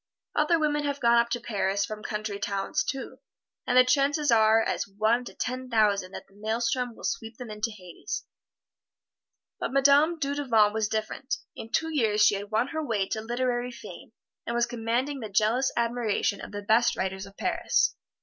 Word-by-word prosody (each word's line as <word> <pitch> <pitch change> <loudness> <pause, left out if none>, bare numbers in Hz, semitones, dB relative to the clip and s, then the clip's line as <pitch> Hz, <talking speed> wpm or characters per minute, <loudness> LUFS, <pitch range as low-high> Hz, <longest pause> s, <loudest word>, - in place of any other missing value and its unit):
Other 305 +3 +3
women 295 -1 0
have 285 0 -2
gone 235 0 +5
up 235 0 +1
to 240 +1 -1
Paris 200 -3 -1
from 215 0 -7
country 210 -1 -4
towns, 200 -1 -1
too, 270 -1 -5 0.5
and 250 - +3
the 255 - +8
chances 285 +2 +2
are 220 -1 +5
as - - -2
one 215 +5 +1
to - - -9
ten 255 0 -4
thousand 205 -5 +2
that - - -8
the 195 - -27
maelstrom 230 +3 -1
will - - -14
sweep 225 0 -3
them 245 -4 -8
into 210 +2 -2
hades. 185 -5 -7 1.3
But - - -2
Madame 285 +4 +5
Dudevant 275 -8 +2
was 220 -1 0
different 220 +5 -2 0.2
in 220 - -8
two 320 +3 0
years 215 -5 +3
she - - +5
had 200 0 -4
won 225 +5 +1
her 315 -1 -3
way 210 -8 -1
to 220 - -2
literary 245 +1 -1
fame, - - -11 0.4
and 235 - -2
was 240 0 +3
commanding 245 +5 -2
the 220 -3 -6
jealous 220 +6 +2
admiration 230 -4 0
of - - -8
the 205 0 -6
best 235 +3 +3
writers 190 +1 -3
of 195 - -16
Paris. - - +1
230 Hz, 185 wpm, -27 LUFS, 210-255 Hz, 1.3 s, the